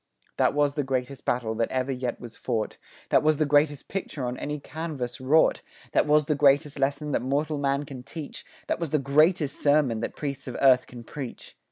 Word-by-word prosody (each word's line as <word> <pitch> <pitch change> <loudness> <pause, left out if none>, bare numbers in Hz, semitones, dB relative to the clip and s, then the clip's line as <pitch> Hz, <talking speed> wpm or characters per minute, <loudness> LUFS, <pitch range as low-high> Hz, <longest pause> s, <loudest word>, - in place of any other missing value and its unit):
That - - +2
was 145 -1 +2
the 145 -1 -1
greatest 130 0 -3
battle 120 -2 0
that 115 +1 -1
ever 130 +1 -1
yet 125 -2 -3
was 120 -2 -9
fought; 110 -2 -3 0.3
That - - +5
was 155 0 +3
the 155 - +2
greatest 145 0 +2
picture 155 -8 -4
on 125 0 -2
any 150 +3 -4
canvas 140 -6 -5
wrought; 150 +5 +3 0.3
That - - +2
was 150 0 +4
the 150 - +1
greatest 145 0 +3
lesson 140 +2 0
that - - +1
mortal 145 +3 -1
man 140 +1 0
can 135 -3 -8
teach; 145 +5 -8 0.2
That - - -2
was 170 -2 -2
the 155 - +2
greatest 150 +2 +2
sermon 145 -6 +3
that 115 - -4
priests 140 -2 -5
of 125 - -5
earth 130 -2 +5
can 120 -1 -10
preach. 130 +1 -8
140 Hz, 205 wpm, -26 LUFS, 130-150 Hz, 0.3 s, That